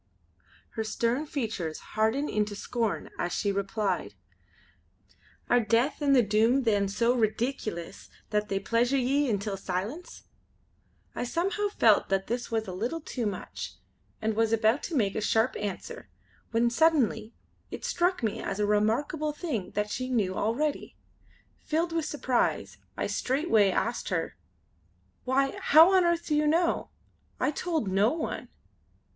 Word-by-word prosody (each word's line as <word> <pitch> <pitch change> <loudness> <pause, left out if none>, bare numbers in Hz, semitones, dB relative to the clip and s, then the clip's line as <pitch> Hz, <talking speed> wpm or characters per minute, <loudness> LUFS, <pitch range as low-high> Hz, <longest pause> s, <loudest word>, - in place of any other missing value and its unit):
Her 225 - -3
stern 235 +6 -1
features 220 - -3 0.2
hardened 220 +7 +1
into 210 -1 -1
scorn 225 +1 -2
as 175 - -1
she 200 - 0
replied: 200 +1 -2 1.3
"Are 245 - +4
Death 235 +6 +1
and 280 -1 +4
the 250 - +6
Doom 225 +6 +3
then 205 -4 +2
so 230 +5 +1
redeekulous 220 -5 -2 0.2
that 210 0 0
they 195 - 0
pleasure 235 +6 +1
ye 270 +2 +1
intil 200 -2 -1
silence?" 200 - -5 0.9
I - - -3
somehow 380 - -1
felt 225 - +3
that 195 0 +1
this 240 +1 -3
was 225 -2 -1
a - - -4
little 235 - -2
too 250 -7 -3
much 195 -3 -6 0.4
and 220 0 0
was 225 +1 +1
about 225 +4 +3
to 340 - -4
make 205 -7 +1
a - - -2
sharp 220 +3 +2
answer, 205 -2 -6 0.4
when 235 +1 +2
suddenly 240 -7 +2 0.3
it - - -6
struck 355 -4 0
me 220 - -1
as 195 - -4
a 210 - +2
remarkable 235 +9 +1
thing 290 - -3
that 210 0 -1
she 255 0 -3
knew 210 -7 +1
already. 275 +10 -1 0.6
Filled 330 +2 -1
with 330 -2 0
surprise 260 -5 -1 0.2
I - - -1
straightway 255 - +2
asked 235 +5 -1
her: - - -2 0.9
"Why, 270 +1 +1
how 325 +6 +7
on 375 -1 +5
earth 340 0 +1
do 305 - -1
you 300 0 +2
know? 335 +3 +1 0.5
I - - +1
told 320 - -2
no 195 +4 +3
one." 320 0 -4
235 Hz, 150 wpm, -28 LUFS, 210-290 Hz, 1.3 s, how